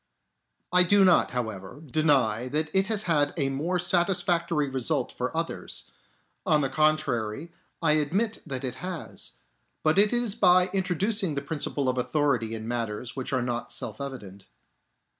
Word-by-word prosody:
I 180 - +7
do 195 +2 +5
not, 180 - +4
however, 110 -2 -5
deny 130 -6 +2
that 150 +3 -2
it 190 +1 +3
has 215 -1 0
had 150 -5 +1
a 140 -3 +1
more 155 +7 -1
satisfactory 175 -3 +1
result 135 +1 -1
for 125 +5 -4
others; 165 0 -4 0.5
on 155 -6 +3
the 135 - 0
contrary, 155 -2 0 0.3
I 160 - +4
admit 180 +10 0
that 135 -3 -4
it 130 -1 -4
has; 180 -2 -6 0.5
but 155 +4 +3
it 210 +1 +5
is 240 -4 0
by 185 -3 +4
introducing 190 -1 0
the 140 - -3
principle 145 -2 -1
of 130 0 0
authority 125 -5 0
in 110 0 -7
matters 115 0 -3
which 130 0 -5
are 130 -2 0
not 120 -1 -3
self - - -5
evident. 105 -9 -8
150 Hz, 155 wpm, -27 LUFS, 125-180 Hz, 0.5 s, I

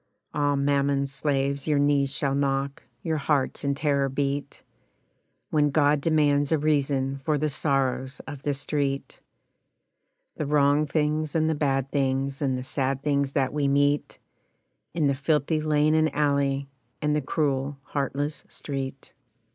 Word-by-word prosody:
Ah! 145 -1 +1
Mammon's 140 0 +1
slaves, 140 -1 -1
your 150 -2 +2
knees 140 -1 +2
shall 140 -1 -1
knock, 140 0 -1 0.2
your 160 -2 0
hearts 140 -2 0
in 140 0 0
terror 140 -2 +1
beat, 140 +1 -3 0.9
When 150 -1 +3
God 145 0 +3
demands 145 -2 +2
a 160 - +4
reason 140 -3 0
for 150 +2 +1
the 155 +1 0
sorrows 135 -2 -1
of 145 -2 -8
the 145 -1 -1
street, 140 -1 -2 1.2
The 150 - -2
wrong 145 +1 +3
things 150 +1 0
and 160 -1 +2
the 160 - +2
bad 135 -3 0
things 135 0 0
And 130 -3 +1
the 125 - -5
sad 135 0 -2
things 140 -2 0
that 135 -2 0
we 145 -2 +1
meet 145 +1 +1 0.8
In 160 -3 +1
the 140 - +3
filthy 150 +2 0
lane 155 0 +2
and 155 0 +3
alley, 140 -2 +1 0.3
and 150 0 +1
the 150 - +1
cruel, 140 -1 -1
heartless 145 +2 -3
street. 135 -1 -6
140 Hz, 145 wpm, -26 LUFS, 135-150 Hz, 1.2 s, a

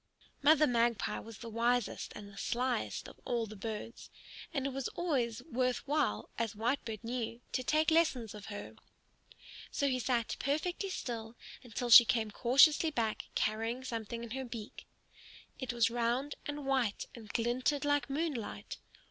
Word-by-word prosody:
Mother 305 +1 +6
Magpie 235 -4 +1
was 225 -2 -10
the 235 - -8
wisest 235 +1 0
and 205 - -8
the 200 - -14
slyest 235 - -1
of - - -13
all 235 -2 0
the 215 0 -9
birds, 220 +2 -6 0.4
and 275 -5 -1
it 275 - -1
was 270 -1 -2
always 255 -10 0
worth 255 -3 -1
while, 295 0 +1
as 230 -2 -1
Whitebird 225 -1 -2
knew, 235 -1 -3
to 255 - -1
take 310 +5 +3
lessons 275 -9 +2
of 210 -2 -9
her. 205 -1 -7 1.0
So 280 - +1
he 255 -2 +1
sat 240 -2 0
perfectly 345 +8 -1
still 230 -9 -5 0.3
until 240 0 -4
she 240 - +13
came 225 -2 0
cautiously 280 +8 +5
back 230 -7 -1
carrying 225 +4 0
something 230 -1 -4
in 235 - -8
her 265 +2 -3
beak. 230 -4 -8 0.7
It 260 -2 -2
was 235 -1 +2
round 240 +4 0
and 290 -1 -4
white 260 -6 +1
and 225 -3 -11
glinted 250 +6 0
like 290 -1 +1
moonlight. 275 -7 -3
240 Hz, 155 wpm, -33 LUFS, 225-275 Hz, 1.0 s, she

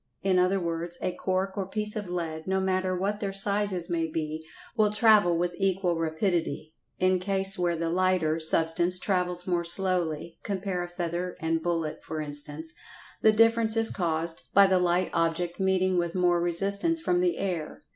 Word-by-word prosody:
In 190 -1 +2
other 185 +2 +2
words, 170 0 -3
a 185 - 0
cork 190 +1 -2
or 195 -3 -3
piece 210 +1 0
of 205 -4 -5
lead, 165 -2 -4
no 190 0 +1
matter 185 -1 0
what 200 +3 -2
their 200 -2 -3
sizes 195 -2 +2
may 165 -1 -1
be, 155 0 -4 0.3
will 215 -2 +3
travel 210 -5 +4
with 175 +1 -1
equal 190 -3 0
rapidity. 160 -2 -2 0.2
In 185 0 +2
case 195 +1 -1
where 175 -1 +1
the 165 0 -2
"lighter" 180 -3 +1
substance 165 +3 +2
travels 180 -2 -1
more 175 -2 0
slowly 170 -3 0
(compare 190 -2 -3
a 175 - -4
feather 175 0 -4
and 165 0 -1
bullet, 165 -2 -2
for 160 - -6
instance) 150 +2 -4 0.5
the 220 - +6
difference 225 0 +3
is 225 0 +4
caused 165 -2 -2
by 200 0 +8
the 190 -1 +3
light 180 0 +1
object 170 +2 -1
meeting 185 -1 +1
with 170 0 -3
more 175 -1 +2
resistance 200 - +2
from 355 +2 0
the 355 -1 +1
air. 175 -6 -4
180 Hz, 175 wpm, -27 LUFS, 165-195 Hz, 0.5 s, by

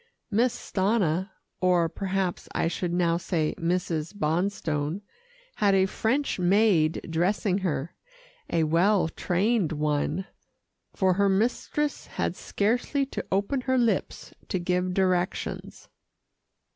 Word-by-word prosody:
Miss 235 +4 +3
Stanna, 190 -3 0 0.3
or 180 -2 +3
perhaps 190 +1 -2
I - - +1
should 175 +1 -2
now 170 -1 +2
say 165 -3 -1
Mrs. 170 0 -1
Bonstone, 165 -2 -1 0.6
had 200 -2 +3
a 190 0 +4
French 230 +6 -1
maid 180 -4 +3
dressing 180 +4 +1
her 165 -4 -2 0.6
a 165 -1 +2
well 170 +3 +3
trained 190 +2 0
one, 150 +4 -1 0.7
for 190 -1 +3
her 200 +2 +2
mistress 245 +8 0
had - - -2
scarcely 245 +6 0
to 270 - -5
open 200 +8 0
her 260 0 +1
lips 230 -5 -1
to - - -1
give 180 +1 -1
directions. 185 -2 -1
185 Hz, 115 wpm, -27 LUFS, 170-205 Hz, 0.7 s, a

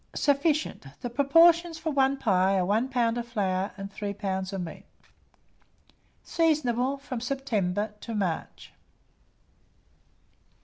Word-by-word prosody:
Sufficient. 290 - 0
The 245 - -4
proportions 330 +5 +4
for 320 0 -3
1 275 -1 +2
pie 195 -5 +2
are 185 - +1
1 220 +7 +1
lb. 240 -2 +1
of 235 - -5
flour 195 -4 -1
and 195 0 -7
3 200 -1 -4
lbs. 190 -2 -3
of 195 -2 -3
meat. 170 -2 -8 1.4
Seasonable 280 -5 +1
from 255 -4 -6
September 215 -6 -1
to 230 - -5
March. 185 -6 -3
235 Hz, 120 wpm, -27 LUFS, 195-275 Hz, 1.4 s, proportions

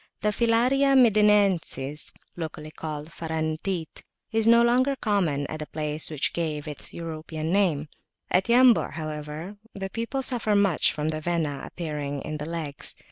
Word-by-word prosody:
The 210 - +2
Filaria 245 +5 +3
Medinensis, 200 - +3 0.2
locally 155 -2 -6
called 155 0 -6
"Farantit," 160 +2 -3 0.3
is 225 0 +2
no 235 0 +7
longer 255 +3 +3
common 180 - 0
at 155 - -6
the 150 - -5
place 150 0 -3
which 155 -3 -1
gave 155 -3 -2
it - - -3
its 145 - -7
European 160 -1 -5
name. 175 -7 +2 0.4
At 185 - +3
Yambu', 245 0 +5
however, 155 +4 -6 0.2
the 195 -1 -5
people 235 +4 -2
suffer 230 -5 +1
much 200 -5 +3
from 150 0 -2
the 155 -1 -2
Vena 155 -4 -1
appearing 145 -4 -4
in 155 0 -4
the 150 +1 -5
legs. 160 -4 -3
165 Hz, 150 wpm, -26 LUFS, 155-210 Hz, 0.4 s, no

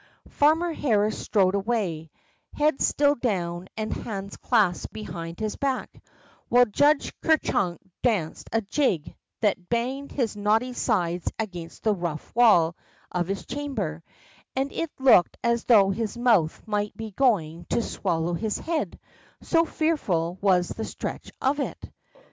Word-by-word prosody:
'' - - -25
Farmer 320 +4 +3
Harris 215 -7 +1
strode 190 -3 +2
away, 195 -7 -1 0.5
head 300 -1 +1
still 285 0 +3
down 185 -8 -2
and 215 0 -2
hands 200 -3 -5
clasped 205 -8 +1
behind 170 -5 -7
his 215 -1 -2
back, 270 -2 -3 0.5
while 245 +1 +6
Judge 285 +7 +2
Ker 320 -1 +4
Chunk 175 - -1 0.2
danced 200 -10 -1
a 225 - +1
jig 200 - 0 0.3
that 190 -5 0
banged 255 +4 -2
his 235 -6 -1
knotty 220 +5 +1
sides 180 -8 0
against 175 -6 -6
the 215 - +3
rough 170 -3 -5
wall 175 -9 +5 0.4
of 175 -1 -1
his 195 0 -3
chamber, 210 - -4 0.5
and 270 +1 -1
it 330 - -2
looked 260 -10 +5
as 235 -1 +1
though 200 -5 +6
his 220 +3 -3
mouth 225 -10 +2
might 210 -1 -2
be 220 -1 -6
going 175 - +1
to 235 - +1
swallow 175 -4 -1
his 210 +4 -1
head, 325 -1 -3 0.4
so 330 -1 +3
fearful 190 - -1
was 185 -3 +3
the 225 - -4
stretch - - -6
of 275 +3 +1
it. 280 - -2
215 Hz, 145 wpm, -26 LUFS, 180-250 Hz, 0.5 s, while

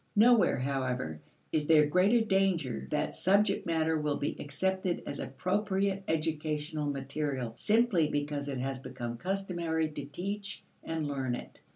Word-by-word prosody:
Nowhere, 230 +2 +6
however, 130 - -2 0.3
is 150 -2 0
there 155 -2 +7
greater 185 +10 +4
danger 190 - +1
that - - -1
subject 200 +1 +2
matter 160 -1 +1
will 150 -1 0
be 145 - -2
accepted 185 +5 -1
as - - -5
appropriate 195 0 0
educational 155 -1 -1
material 135 -3 -2
simply 210 -8 +3
because 145 -1 -2
it 135 - -3
has 130 +1 -2
become 120 -2 -5
customary 175 -4 -1
to 145 -2 -6
teach 200 +7 -5 0.2
and 160 -2 -2
learn 135 -3 -1
it. - - -10
160 Hz, 140 wpm, -31 LUFS, 140-190 Hz, 0.3 s, there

